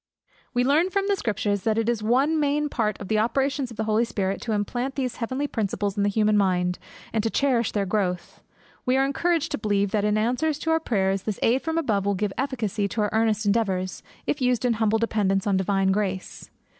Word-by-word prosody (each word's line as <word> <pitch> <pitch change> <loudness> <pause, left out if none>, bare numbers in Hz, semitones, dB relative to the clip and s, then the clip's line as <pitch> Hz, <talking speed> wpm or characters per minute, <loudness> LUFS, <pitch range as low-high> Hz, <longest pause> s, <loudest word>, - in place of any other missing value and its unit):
We 245 - +3
learn 300 +8 +3
from 395 +1 0
the 400 - +2
Scriptures 205 - -1
that 220 +2 0
it 225 0 0
is 235 -2 0
one 270 +8 +2
main 295 0 +1
part 215 -6 -1
of 200 - -7
the 215 +1 +1
operations 265 +4 0
of 230 - -11
the 220 - -1
Holy 215 +1 +2
Spirit, 195 -4 -2
to 230 - -3
implant 240 +6 -2
these 255 -3 -2
heavenly 260 +4 -2
principles 205 -5 -2
in 205 - 0
the 200 - +2
human 215 +1 +2
mind, 180 -2 +1 0.3
and 220 - +2
to 225 - +1
cherish 245 -3 +1
their 205 -2 0
growth. 180 -2 -2 0.4
We 255 +1 +2
are 270 - +3
encouraged 330 +3 0
to - - -2
believe 205 -2 0
that 210 -2 +1
in 210 0 +2
answer 250 +8 +1
to 305 +2 -2
our 320 - +3
prayers, 195 -9 0
this 210 0 -3
aid 250 +4 +3
from 325 0 -2
above 210 -11 0
will 200 - +2
give 200 0 -2
efficacy 225 -6 -1
to 215 - -2
our 210 - 0
earnest 220 -1 +1
endeavours, 195 -4 0 0.2
if 295 - -1
used 250 -1 +1
in 245 - +3
humble 220 0 +3
dependence 205 -4 0
on 200 -2 +2
divine 190 0 +1
grace. 190 -2 -3
220 Hz, 220 wpm, -25 LUFS, 200-260 Hz, 0.4 s, We